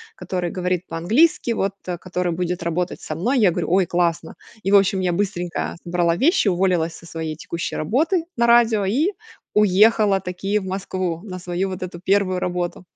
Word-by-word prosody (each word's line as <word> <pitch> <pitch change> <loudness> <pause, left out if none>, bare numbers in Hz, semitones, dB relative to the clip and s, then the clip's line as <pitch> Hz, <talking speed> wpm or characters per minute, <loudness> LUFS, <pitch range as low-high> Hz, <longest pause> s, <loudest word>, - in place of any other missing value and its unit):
который 180 -2 -3
говорит 180 0 -1
по-английски 230 - +2
вот 195 -2 -1
а 175 -1 -2
который 180 0 -2
будет 175 +1 -2
работать 170 +1 -2
со 155 - -5
мной". 245 +10 +1
Я 195 -5 +5
говорю: 170 0 -2
"Ой, 190 -1 +4
классно!" 170 -2 -1 0.3
И 195 - 0
в - - +6
общем 195 -1 +2
я 180 -1 +1
быстренько 180 -3 -2
собрала 170 -1 +1
вещи, 290 - +3
уволилась 175 -3 +1
со - - -15
своей 160 -2 -5
текущей 170 +2 -5
работы 320 - +1
на 235 0 +3
радио, 230 -4 +4
и 280 - +2 0.4
уехала 210 0 +4
таки 195 +3 -2
в - - -8
Москву 185 -3 -3
на 185 -3 -6
свою 180 +2 -2
вот 185 -1 -5
эту 175 -1 -7
1 190 -1 +1
работу. 180 0 -3
185 Hz, 180 wpm, -22 LUFS, 175-200 Hz, 0.4 s, в